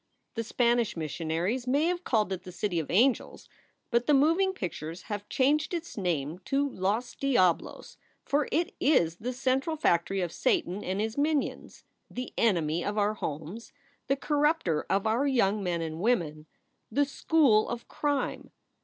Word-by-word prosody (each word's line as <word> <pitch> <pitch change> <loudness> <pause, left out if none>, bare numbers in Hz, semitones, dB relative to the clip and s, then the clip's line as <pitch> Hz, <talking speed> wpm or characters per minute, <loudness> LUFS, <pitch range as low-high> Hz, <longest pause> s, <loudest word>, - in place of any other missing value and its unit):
"The 230 - -2
Spanish 235 -2 +1
missionaries 165 - -2
may 285 +5 +2
have 355 +1 -1
called 215 - +1
it 185 - -5
the 185 0 -10
City 180 -1 -1
of 155 - -5
Angels; 240 +7 +1 0.4
but 235 0 +1
the 295 - +5
moving 330 +7 +3
pictures 175 - -6
have 205 -1 -6
changed 300 +6 +2
its 340 0 -6
name 170 -4 -2
to 280 +1 +1
Los 220 +1 -2
Diablos! 210 -11 0 0.3
For 285 0 +1
it 345 +6 0
is 170 - +3
the 245 +6 -4
central 265 +5 0
factory 190 - +1
of 175 -2 -2
Satan 185 +4 0
and 190 +2 -2
his 220 +5 -2
minions, 295 -1 -1 0.3
the 250 0 -6
enemy 170 -6 +1
of 205 +1 -3
our 210 0 +2
homes, 165 +4 -6 0.3
the 275 - +2
corrupter 295 - +1
of 195 +1 +1
our 235 +6 +2
young 215 -6 +2
men 175 -3 -1
and 160 0 -5
women 160 -9 0 0.4
the 285 +6 +2
school 275 -6 +3
of 240 0 -5
crime. 290 -2 -2
225 Hz, 160 wpm, -28 LUFS, 180-275 Hz, 0.4 s, the